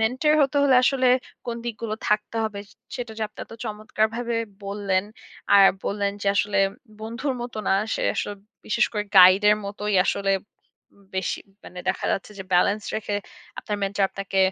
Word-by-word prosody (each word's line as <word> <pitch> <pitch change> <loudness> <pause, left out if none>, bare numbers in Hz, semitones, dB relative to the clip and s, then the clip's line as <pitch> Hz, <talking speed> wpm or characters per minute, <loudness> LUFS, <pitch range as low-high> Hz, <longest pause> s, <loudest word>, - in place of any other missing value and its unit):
Mentor 255 +7 +2
হতে 275 +1 0
হলে 275 -2 +5
আসলে 260 -1 +2 0.4
কোন 235 -1 -3
দিকগুলো 225 -1 -4
থাকতে 210 +2 0
হবে 215 -2 -4
স - - -21 0.3
সেটা 240 -3 -5
যে - - -2
আপনি - - -27
এত - - -16
চমৎকারভাবে 220 +2 -2 0.3
বললেন। 195 -1 -1 0.5
আর 200 -1 +8 0.2
বললেন 200 0 -1
যে - - -4
আসলে 205 0 +1 0.4
বন্ধুর 235 +5 -3
মতো 240 -2 -6
না, - - +4 0.2
সে - - -2
আসলে 205 - -2 0.3
বিশেষ - - +2
করে 210 -1 -1
গাইড 185 +2 +9
এর 210 - +4
মতোই 205 +1 -3
আসলে 200 0 0 0.6
উম 200 - -23
বেশি 190 - -1 0.3
মানে 180 - -10
দেখা - - -1
যাচ্ছে 195 - -3
যে 190 - -6
ব্যালেন্স 200 +4 +3
রেখে 205 -1 -2 0.4
আপনার 210 -1 -3
মেন্টর 200 0 0
আপনাকে 195 0 -4
210 Hz, 170 wpm, -24 LUFS, 200-230 Hz, 0.6 s, গাইড